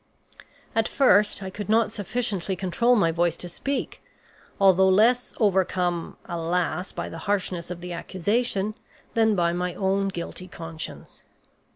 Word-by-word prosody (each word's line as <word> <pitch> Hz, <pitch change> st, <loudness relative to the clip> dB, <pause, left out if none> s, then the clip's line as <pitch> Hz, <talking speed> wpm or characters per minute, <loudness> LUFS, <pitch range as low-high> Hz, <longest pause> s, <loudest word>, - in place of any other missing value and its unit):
At 225 Hz, -1 st, +2 dB
first 210 Hz, -7 st, +3 dB
I 190 Hz, -, -5 dB
could 205 Hz, +2 st, -6 dB
not 225 Hz, +1 st, +3 dB
sufficiently 205 Hz, -3 st, -2 dB
control 195 Hz, +7 st, +2 dB
my 170 Hz, -7 st, +3 dB
voice 170 Hz, 0 st, +1 dB
to 180 Hz, -, -3 dB
speak, 275 Hz, +10 st, -3 dB, 0.6 s
although 190 Hz, -1 st, +6 dB
less 235 Hz, +6 st, +3 dB
overcome, 180 Hz, -4 st, +1 dB
alas, 175 Hz, +1 st, -1 dB
by -, -, -4 dB
the 165 Hz, -, -7 dB
harshness 185 Hz, -4 st, -1 dB
of 175 Hz, -1 st, -6 dB
the 180 Hz, 0 st, -5 dB
accusation 200 Hz, +4 st, -1 dB, 0.4 s
than 220 Hz, -2 st, +3 dB
by 170 Hz, -2 st, +2 dB
my 180 Hz, 0 st, -2 dB
own 195 Hz, 0 st, +1 dB
guilty 185 Hz, 0 st, -5 dB
conscience. 165 Hz, -2 st, -8 dB
190 Hz, 140 wpm, -25 LUFS, 175-210 Hz, 0.6 s, although